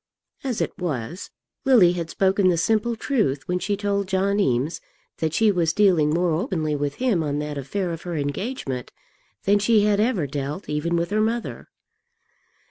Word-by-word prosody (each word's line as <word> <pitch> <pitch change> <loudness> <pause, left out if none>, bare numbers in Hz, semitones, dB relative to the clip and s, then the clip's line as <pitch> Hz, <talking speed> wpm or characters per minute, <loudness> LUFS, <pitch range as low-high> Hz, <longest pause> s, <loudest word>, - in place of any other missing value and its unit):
As 255 -5 -2
it - - -1
was, 165 - -4 0.3
Lily 235 -10 +6
had 170 -2 -4
spoken 190 +2 +2
the 175 - +2
simple 220 +6 +1
truth 185 - -1
when 180 0 0
she 205 +2 -1
told 200 -1 -1
John 195 +1 +1
Eames 140 -1 0 0.4
that 160 -1 0
she 215 +6 +3
was 170 -4 +1
dealing 180 -8 +4
more 170 +2 +1
openly 160 - -1
with 145 0 -2
him 245 -9 +1
on 145 -2 -1
that 150 0 -3
affair 175 +7 -3
of 165 - -7
her 175 -1 -5
engagement 145 - -3 0.5
than 205 +1 +3
she 210 0 +4
had 205 -1 +2
ever 215 - +1
dealt, 145 +6 -4
even 150 +3 -1
with 170 +2 -1
her 215 +1 +2
mother. 230 +2 -2
180 Hz, 175 wpm, -23 LUFS, 150-205 Hz, 0.5 s, Lily